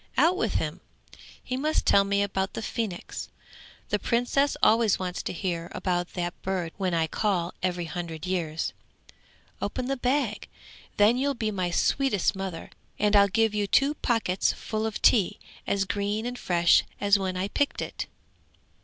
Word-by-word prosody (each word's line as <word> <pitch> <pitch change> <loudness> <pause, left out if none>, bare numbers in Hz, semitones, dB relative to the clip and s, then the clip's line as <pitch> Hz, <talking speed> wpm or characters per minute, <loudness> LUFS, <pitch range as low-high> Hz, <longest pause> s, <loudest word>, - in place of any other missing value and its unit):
Out 345 +3 +5
with - - -1
him. - - -2 0.6
He 255 - -3
must 305 +4 0
tell 200 - +6
me 200 0 +1
about 195 -1 -2
the 225 - -4
phoenix; 215 -6 -4 0.6
the - - +1
Princess 245 +4 +1
always 225 -2 +5
wants 180 -1 -3
to - - -4
hear 170 -2 -3
about 175 -1 -1
that 175 -1 -4
bird 185 -3 -2
when 185 -3 0
I 165 -1 +2
call 180 -1 -1
every 180 -2 -1
hundred 165 -1 -5
years. 165 -4 -2 0.9
Open 255 - -2
the 275 +2 0
bag! 250 -3 0 0.5
then 210 +4 +5
you'll 280 +1 0
be 220 -2 -1
my 185 -3 -1
sweetest 210 +2 +1
mother, 190 -4 -5 0.3
and 210 0 +2
I'll 200 0 +7
give 220 +2 +2
you 205 -1 0
two 275 +7 +3
pockets 225 -9 +1
full 220 0 -3
of 220 - -5
tea 205 -7 +4 0.3
as 195 -1 +1
green 205 +3 -2
and 245 0 -4
fresh 175 -1 +4 0.2
as 200 0 +4
when 185 -1 -2
I 185 +2 -1
picked 285 +7 0
it!' - - -4
200 Hz, 165 wpm, -27 LUFS, 180-230 Hz, 0.9 s, I'll